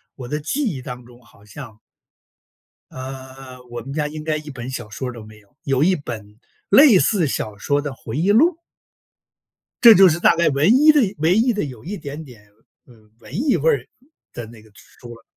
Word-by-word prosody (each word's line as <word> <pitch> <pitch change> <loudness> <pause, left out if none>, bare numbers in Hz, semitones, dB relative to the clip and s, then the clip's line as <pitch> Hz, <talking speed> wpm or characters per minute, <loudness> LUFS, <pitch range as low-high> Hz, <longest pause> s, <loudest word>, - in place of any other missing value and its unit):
我 125 -3 -9
的 150 +2 -2
记 210 - -3
忆 160 - -3
当 125 0 -9
中 120 0 -18
好 110 -3 -23
像 105 +1 -12 1.1
呃， 130 0 -10
我 120 0 -7
们 135 - -9
家 150 -1 -2
应 155 0 -8
该 155 -1 -1
1 150 0 -10
本 125 -2 -8
小 130 -5 -7
说 125 +4 -5
儿 - - -8
都 115 -3 -11
没 110 0 -15
有， 105 +5 -29
有 140 -3 0
1 185 +2 +3
本 110 -7 -9 0.3
类 275 -9 +7
似 180 -4 +1
小 110 -5 -4
说 145 +7 -1
的 145 -2 -5
回 120 -1 -8
忆 185 +6 +2
录。 320 +10 +3 1.3
这 230 -2 +10
就 190 -2 +7
是 165 +2 -1
大 - - +4
概 170 -1 +2
唯 145 +6 +1
一 290 +6 +6
的 300 - +3 0.2
唯 165 +4 +2
一 235 +2 +2
的 210 - -2
有 125 -6 -10
一 200 +5 -6
点 145 0 -8
点， 125 -7 -15 0.4
呃， 125 - -19 0.3
文 - - -16
艺 260 - +1
味 160 +2 +1
儿 130 -2 0 0.5
的 120 - -7
那 115 -1 -15
个 110 -1 -21
书 120 +3 -15
了。 115 - -19
140 Hz, 220 characters per minute, -20 LUFS, 120-175 Hz, 1.3 s, 这